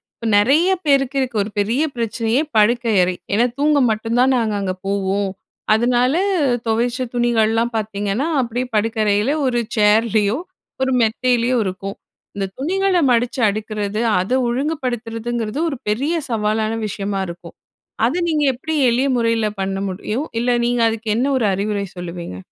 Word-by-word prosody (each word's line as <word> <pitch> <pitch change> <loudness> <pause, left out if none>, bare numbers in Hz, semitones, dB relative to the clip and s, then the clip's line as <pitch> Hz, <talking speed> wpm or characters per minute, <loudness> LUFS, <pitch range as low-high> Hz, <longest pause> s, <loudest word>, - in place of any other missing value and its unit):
இப்ப 230 - -5
நெறைய 290 - +4 0.2
பேருக்கு 275 -1 +2
இருக்க 250 -3 -3
ஒரு 210 - -7
பெரிய 230 +7 +1
பிரச்சனையே, 230 +2 0 0.2
படுக்கை 230 +2 +3
அறை. 180 0 -1 0.2
ஏனா, 235 +4 +3
தூங்க 295 0 +3
மட்டும் 225 +2 -2
தான் 265 +1 +4
நாங்க 225 -2 0
அங்க 185 -1 -1
போவோம். 200 0 0 0.4
அதனால 245 +4 +2 0.5
தொவச்ச 240 +3 0
துணிகள்லாம் 230 -1 +1
பார்த்தீங்கன்னா, 210 +4 -2
அப்படியே 245 +1 -2
படுக்கறையில 215 +1 +1
ஒரு 240 -2 +1 0.2
சேர்லயோ, 215 +1 +3 0.4
ஒரு 265 0 +1
மெத்தையிலயோ 245 +2 +1
இருக்கும். 195 +1 -5 0.4
இந்த 195 -1 -1
துணிகள 375 +6 +1
மடிச்சு 240 +2 +1
அடுக்குறது, 210 0 -3 0.2
அத 185 +5 -3 0.2
ஒழுங்குபடுத்துறதுங்கறது 240 -3 -3
ஒரு 275 - -4
பெரிய 275 +11 0 0.2
சவாலான 215 0 0
விஷயமா 195 -1 -3
இருக்கும். 170 0 -10 0.5
அத 250 +7 0
நீங்க 310 -3 +1
எப்படி 315 +6 -5 0.2
எளிய 250 +4 +1
முறையில 230 -2 +1
பண்ண 195 0 -2
முடியும்? 215 +8 -3 0.2
இல்ல 245 0 +2
நீங்க 240 0 +1
அதுக்கு 225 0 -5
என்ன 250 +4 +1
ஒரு 230 - +1
அறிவுரை 200 +1 -1
சொல்லுவீங்க? 170 - -6
230 Hz, 140 wpm, -19 LUFS, 210-250 Hz, 0.5 s, நெறைய